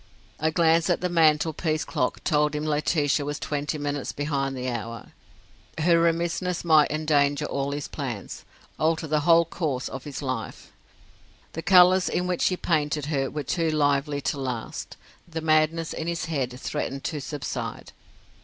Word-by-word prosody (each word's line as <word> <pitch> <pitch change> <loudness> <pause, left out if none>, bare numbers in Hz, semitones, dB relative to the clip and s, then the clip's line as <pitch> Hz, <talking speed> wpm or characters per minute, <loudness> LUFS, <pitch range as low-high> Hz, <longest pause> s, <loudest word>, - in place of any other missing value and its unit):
A 155 - +2
glance 165 +1 +3
at 175 - +1
the 180 - 0
mantel 160 -2 +3
piece 155 -1 -1
clock 125 - -2
told 150 -2 +2
him 150 +1 -2
Laetitia 150 -1 +1
was 145 +1 -3
twenty 145 0 -3
minutes 145 -1 -3
behind 140 -2 -2
the 125 0 -3
hour. 115 -2 -5 0.7
Her 170 +1 +4
remissness 170 +2 0
might 155 -3 +5
endanger 150 -1 +1
all 140 -1 -2
his 145 0 -4
plans, 120 -9 -6 0.4
alter 160 +1 +1
the 155 0 +1
whole 165 +2 +5
course 150 -6 -2
of 135 -1 -7
his 145 0 -6
life. 130 -5 -5 0.8
The 165 - -4
colours 180 +1 +6
in 180 - -1
which 180 -1 0
he 185 - +2
painted 150 -4 0
her 135 -2 0
were 150 - -4
too 165 +4 0
lively 145 -1 +1
to 140 - -2
last; 125 -4 -5 0.3
the 165 -1 -4
madness 155 +1 +2
in 160 - -4
his 170 -1 -2
head 130 -6 -3
threatened 135 0 -3
to 150 -3 -3
subside. 145 0 -5
150 Hz, 165 wpm, -25 LUFS, 140-165 Hz, 0.8 s, colours